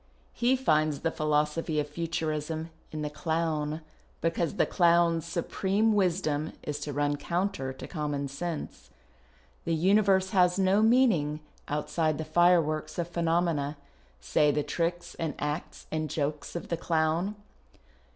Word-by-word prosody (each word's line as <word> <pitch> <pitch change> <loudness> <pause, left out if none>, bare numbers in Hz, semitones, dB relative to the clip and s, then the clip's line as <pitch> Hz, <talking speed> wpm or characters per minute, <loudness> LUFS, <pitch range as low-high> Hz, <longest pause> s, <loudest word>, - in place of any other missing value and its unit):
lie 245 +2 +4
finds 155 - +1
the 165 - 0
philosophy 150 +1 0
of 150 - -1
Futurism 160 0 -3 0.2
in 155 -1 -4
the 150 - -2
clown, 160 -1 -1 0.4
because 165 +2 0
the - - +3
clown's 170 -2 +3
supreme 195 +6 +1
wisdom 165 -6 0
is 150 -1 -3
to 145 0 -4
run 145 +1 0
coimtcr 170 -5 -2
to - - -7
common 145 -4 -2
sense. 150 - -5 0.4
" 60 0 -33
The 165 - +1
universe 190 +2 +3
has 180 -2 +4
no 195 +2 +3
meaning 220 - +3 0.3
outside 155 +1 0
the 160 - -4
fireworks 155 -1 +2
of 175 -1 -2
phenomena 165 -4 0 0.2
— 65 +1 -33
say 145 - +2
the 145 0 +1
tricks 170 +4 -2
and 160 -2 -2
acts 150 +2 -4
and 155 -1 -2
jokes 145 +1 -3
of 170 - -5
the 170 - -1
clown. 165 +5 0
160 Hz, 140 wpm, -29 LUFS, 150-175 Hz, 0.4 s, lie